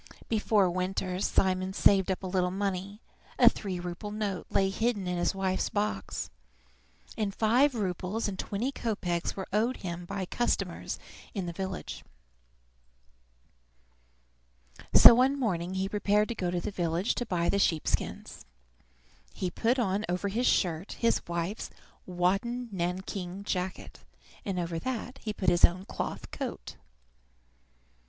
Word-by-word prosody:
Before 210 -3 +3
winter 185 0 -2
Simon 185 -1 +1
saved 195 -1 +4
up 190 0 -1
a - - -3
little 180 -1 +1
money: 195 +2 -3 0.4
a - - +6
three 190 -4 +2
rouble 175 +4 -5
note 205 -4 -3
lay 195 -1 +2
hidden 220 -1 0
in 180 -1 -1
his 175 - +1
wife's 190 -1 0
box, 205 - -2 0.8
and 205 -2 -2
five 250 +5 +4
roubles 195 +1 -2
and 190 -2 -5
twenty 225 +7 -2
kopeks 185 -9 -2
were 190 - -5
owed 230 +5 +2
him 175 0 -4
by 195 +1 -3
customers 240 +6 -1 0.4
in 195 -3 -2
the 170 - -4
village. 190 +1 -5 2.9
So - - +11
one 260 +4 +3
morning 185 -6 -1
he 190 +1 0
prepared 210 +1 +2
to - - -1
go 185 -5 -2
to 175 0 0
the 190 - -4
village 175 +2 0
to 245 - -2
buy 170 -3 0
the 200 - +2
sheep 165 -5 +2
skins. - - -2 0.9
He 180 -2 -2
put 235 +7 +1
on 205 -4 +1
over 180 +3 0
his 235 +5 +1
shirt 175 0 +1
his 230 0 +1
wife's 170 +4 -3 0.4
wadded 200 +7 0
nankeen 185 +1 -3
jacket, 185 -2 -3 0.5
and 195 -2 -2
over 170 -1 -2
that 255 +4 -4
he 215 - -3
put 190 -3 +1
his 175 0 +2
own 185 +2 +5
cloth - - -5
coat. - - -5
190 Hz, 145 wpm, -29 LUFS, 180-210 Hz, 2.9 s, So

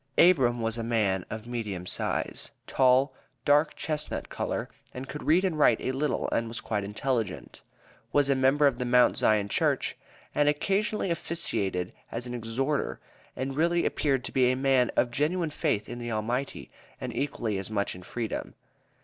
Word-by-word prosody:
Abram 130 -9 +5
was 115 +1 -1
a - - -2
man 105 -5 0
of 110 0 -6
medium 105 -7 -4
size, - - -2 0.2
tall, 130 +1 +3 0.3
dark 150 +2 +4
chestnut 150 -1 -3
color, - - -3 0.3
and 130 +1 -6
could 150 +2 -6
read 175 +5 +3
and 165 -5 -1
write 120 -6 +5
a - - -1
little 145 +3 -1
and 115 - 0
was 115 0 -5
quite 105 -2 -2
intelligent; 105 -1 -3 0.5
"was 145 -1 +3
a 140 - +4
member 135 +2 +3
of 135 -3 +2
the 125 - -1
Mount 125 0 +5
Zion 105 -2 +2
Church," - - 0 0.4
and 145 0 +3
occasionally 195 +6 0
officiated 100 - 0 0.2
as 115 +1 -4
an 125 - -5
"exhorter," 125 +5 -1 0.4
and 135 +1 -3
really 170 +3 +2
appeared 135 -4 +1
to - - -5
be 125 -1 +4
a - - +1
man 130 -2 +3
of 120 - +2
genuine 155 +4 0
faith 140 -9 -1
in 120 - -6
the 120 0 -4
Almighty, 120 +5 -3 0.3
and - - -5
equally 115 -8 -1
as 95 - -6
much 100 -2 -1
in 90 - -10
freedom. 110 +4 -4
125 Hz, 175 wpm, -28 LUFS, 115-145 Hz, 0.5 s, Abram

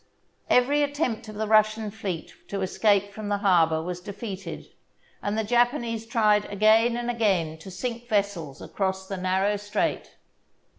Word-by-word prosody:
Every 280 +4 +4
attempt 285 -7 -1
of 215 - -9
the 220 +1 -2
Russian 215 0 +3
fleet 195 -6 -5
to 200 -1 -4
escape 200 +1 +2
from 210 0 -6
the 205 - +1
harbour 165 -5 +3
was 180 +1 -5
defeated, 195 -2 -7 0.6
and 205 +1 -2
the 220 - +1
Japanese 235 0 +1
tried 215 -3 +3
again 220 +3 +3
and 240 0 -1
again 185 -9 0
to 175 - -10
sink 240 +5 -5
vessels 195 -9 -1
across 190 -1 -2
the 195 - -4
narrow 190 +3 +1
strait. 205 +1 -2
210 Hz, 150 wpm, -26 LUFS, 190-225 Hz, 0.6 s, Every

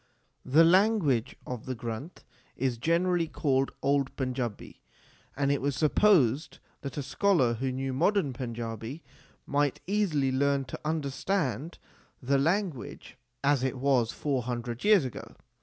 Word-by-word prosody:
The 150 +6 +6
language 170 - +3
of 125 -2 -6
the 130 - -2
Granth 120 +8 -7 0.3
is 125 -2 -1
generally 170 +3 +1
called 135 -3 0
old 140 -1 +1
Panjabi; 125 -5 -4 0.6
and 140 -1 +1
it 140 - 0
was 140 0 -1
supposed 155 - +3 0.2
that 140 0 -6
a 145 - -2
scholar 140 -3 +2
who 130 +3 -2
knew 135 +1 -3
modern 165 0 +1
Panjabi, 115 +2 -5 0.4
might 145 -1 0
easily 170 -9 +1
learn 140 +1 +1
to 125 - -7
understand 155 0 -2 0.4
the 135 +1 +1
language 165 - -2 0.3
as 140 -2 +3
it 130 0 -1
was 125 -3 +2
four 140 -4 -1
hundred 120 0 -4
years 205 -8 +5
ago. 115 -2 -8
140 Hz, 135 wpm, -29 LUFS, 125-160 Hz, 0.6 s, The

